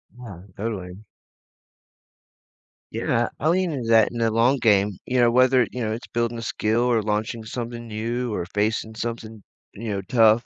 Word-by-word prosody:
Yeah, 105 -8 -10
totally. 95 -4 -5 1.9
Yeah, - - 0
I 155 - +1
lean 180 -1 +2
into 120 -4 -4
that 110 -1 +5
in 120 - -5
the 115 -1 +2
long 120 +5 +3
game, 100 -3 +3
you 125 0 0
know, 120 -1 +5
whether, 130 +1 +4
you 125 - -5
know, 110 - -1
it's 115 +3 -5
building 120 0 -1
a - - -5
skill, 110 0 0
or 120 -3 +2
launching 110 +2 -2
something 120 +1 -6
new, 115 +2 -3
or 90 -3 -2
facing 110 +1 -1
something, 115 -2 -5 0.3
you 110 +2 -6
know, 100 -1 -2
tough, 115 -1 +4
115 Hz, 170 wpm, -24 LUFS, 110-120 Hz, 1.9 s, that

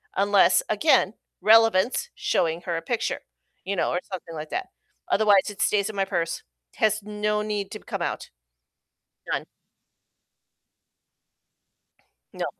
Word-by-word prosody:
unless, 200 -2 +4
again, 215 -2 +3 0.3
relevance, 225 - +4
showing 180 - 0
her 170 -2 -3
a - - -3
picture, 240 +4 -2 0.4
you 200 +1 -2
know, - - +1
or 175 - 0
something 175 -3 -7
like 155 0 -6
that. 375 - -3 0.4
Otherwise, 205 -2 +4
it 205 - -7
stays 205 0 +2
in 215 - -7
my 195 -1 +1
purse. 170 -4 -2 0.4
Has 215 -1 +2
no 210 0 -1
need 210 -2 -3
to 215 - -6
come - - -6
out. - - -3 1.0
None. - - -1 2.9
No. - - -2
205 Hz, 130 wpm, -25 LUFS, 185-215 Hz, 2.9 s, unless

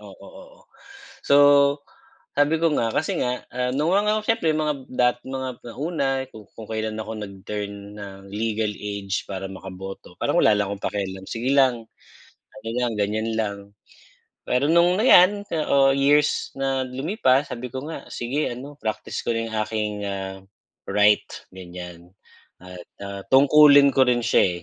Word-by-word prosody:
Oo, - - -11
oo. - - -15 0.6
So 140 - +4 1.0
sabi 145 +3 +3
ko 165 - +4
nga, 115 -4 +1
kasi - - -1
nga, 125 0 -2
ah, 125 +1 -1
nung 150 +5 +1
mga 210 +2 +2
siyempre 170 -9 +1
mga 150 -1 0
dating 125 0 0
mga 130 0 -3 0.2
nauna, 145 0 -2 0.2
kung 110 0 -12
kailan 110 0 -3
ako 110 +1 -6
nag-turn 100 0 -7
ng 100 -1 -9
legal 110 0 -1
age 100 -1 -4
para 95 -1 -5
makaboto, 95 0 -9
parang - - +1
wala 105 - +5
lang 100 -1 -1
akong 100 0 -7
pakialam. 95 -2 -4
Sige 120 +3 -2
lang, 130 -5 +3 0.6
ano 130 -4 -11
lang, 125 -1 0
ganiyan 110 +2 -1
lang. 105 -2 -1 0.9
Pero 125 +3 +2
nung, 175 +3 +4
ayan, 205 -3 +6 0.3
oh, 135 -1 +4
years 145 +2 +2
na 135 -1 0
lumipas, 135 - +1
sabi 125 +1 -5
ko 130 +3 -6
nga, 165 - -7
sige, 135 +6 -2
ano, 135 +4 -9
praktis 110 -1 -4
ko - - -1
na - - -1
'yung 110 - -7
aking, 110 0 -2
ah, 95 -1 -5 0.5
right, 105 0 +4 0.3
ganiyan 90 -1 -10 0.5
at, 90 0 -11 0.2
ah, 100 0 -6
tungkulin 140 +1 +7
ko 135 - +5
rin 125 -1 +2
siya, 90 -5 +2
120 Hz, 150 wpm, -23 LUFS, 100-140 Hz, 1.0 s, tungkulin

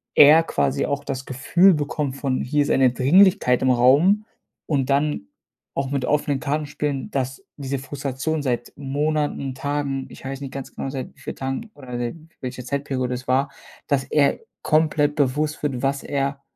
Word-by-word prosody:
er 155 +3 +8
quasi 140 -3 0
auch 140 0 -2
das 135 -2 -4
Gefühl 170 +9 +4
bekommt 145 -2 -2
von 135 -2 -1
hier 145 +3 +1
ist - - -1
eine 130 -2 +4
Dringlichkeit 145 - +4
im 130 - +3
Raum 145 - +4 0.4
und 140 -3 0
dann 140 - +1 0.5
auch 135 0 -2
mit 140 -2 -1
offenen 145 -2 0
Karten 150 +3 -1
spielen, 145 -2 -3
dass 135 +7 -3
diese 140 -1 -3
Frustration 140 +3 -3
seit 120 -3 -2
Monaten, 145 -1 -1
Tagen, 140 -1 -2
ich - - -13
weiß 135 +1 -5
nicht 135 -2 -6
ganz 135 -1 -7
genau 135 - -4
seit 135 -1 -6
wie - - -23
vielen - - -6
Tagen 135 +12 -4
oder 125 -4 -7
seit 120 +3 -3 0.3
welche 125 0 -5
Zeitperiode 130 -2 -2
es 125 +1 -8
war, 135 +2 +2 0.4
dass 140 -2 +1
er 145 -2 +2 0.2
komplett 155 -1 +2
bewusst 150 +2 0
wird, 135 -4 -1
was 135 0 0
er 140 -1 -2
140 Hz, 175 wpm, -23 LUFS, 130-150 Hz, 0.5 s, er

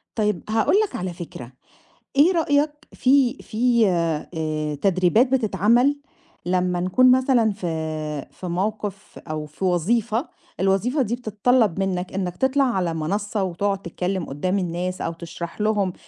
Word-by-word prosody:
طيب، 210 -5 0
هاقول 220 - +2
لك - - -11
على 180 0 -3
فكرة، 160 -8 -9 0.6
إيه 300 +7 +6
رأيك، 295 -3 +2 0.2
في 265 0 +3
في 235 -1 +2
آآ، 155 -3 -1
تدريبات 185 - +3
بتتعمل، 240 +4 +3 0.5
لمّا 180 0 +1
نكون 250 +8 +4
مثلًا 255 -4 +3
في 195 -3 -5 0.6
في 185 - -8
موقف 200 +2 -3
أو 155 -1 -3
في 150 +6 -5
وظيفة، 220 - +1 0.3
الوظيفة 195 - +1
دي 235 -1 0
بتتطلّب 220 -3 +1
منّك 185 -1 -2
إنّك 180 -2 -3
تطلع 265 +1 +2
على 190 -10 0
منصّة 200 +6 -2
وتقعد 195 +2 -1
تتكلّم 180 0 -3
قدّام 180 +8 -1
الناس 180 +1 -3
أو 165 - -2
تشرح 170 +3 -7
لهم، 205 -4 +1
195 Hz, 135 wpm, -23 LUFS, 175-235 Hz, 0.6 s, إيه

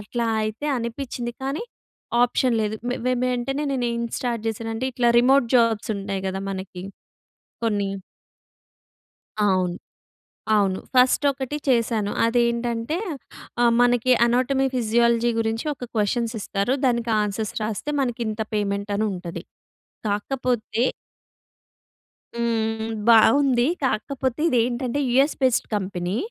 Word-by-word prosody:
అట్లా 230 +3 -3 0.2
అయితే 215 +7 -3
అనిపించింది. 240 0 -4
కానీ 275 +9 -2 0.6
ఆప్షన్ 245 0 +2
లేదు. 215 0 -1 0.3
వే 255 - +2
వెంటనే 255 +3 -1
నేను 250 -2 0
ఏం 235 - -2 0.2
స్టార్ట్ 235 -3 -2
చేశానంటే, 225 +3 -3
ఇట్లా 240 -1 +3
రిమోట్ 260 -1 +4
జాబ్స్ 225 -2 +2
ఉంటాయి 195 -1 -4
కద 190 +1 -3
మనకి. 190 -1 -6 0.8
కొన్ని. 205 -3 0 1.5
అవును. 185 -3 +2 0.8
అవును. 195 -2 +2 0.2
ఫస్ట్ 255 +3 +4
ఒకటి 270 +2 -4
చేశాను. 230 -4 +1
అది 230 +1 +2
ఏంటంటే 235 +5 -2 0.7
ఆహ్, 235 - +5
మనకి 245 +1 +3
అనాటమీ, 255 +3 +2
ఫిజియాలజీ 235 0 +2
గురించి 225 +3 -1
ఒక 255 - -10
క్వెషన్స్ 225 +2 0
ఇస్తారు. 200 +7 -1
దానికి 235 -2 +1
ఆన్సర్స్ 210 +1 -3
రాస్తే 220 +7 -3
మనకి 245 -2 -2
ఇంత 215 +1 -4
పేమెంట్ 200 0 -1
అనుంటది. 190 -5 -3 0.6
కాకపోతే 235 +2 -1 1.5
హ్మ్. 225 -1 -1 0.2
బాగుంది 245 +2 +5 0.2
కాకపోతే 260 +2 -1
ఇది 250 - +2
ఏంటంటే, 245 +2 -2
యూఎస్ 270 +5 +3
బేస్డ్ 255 -2 +2
కంపెనీ 185 0 -3
235 Hz, 115 wpm, -23 LUFS, 210-250 Hz, 1.5 s, ఆహ్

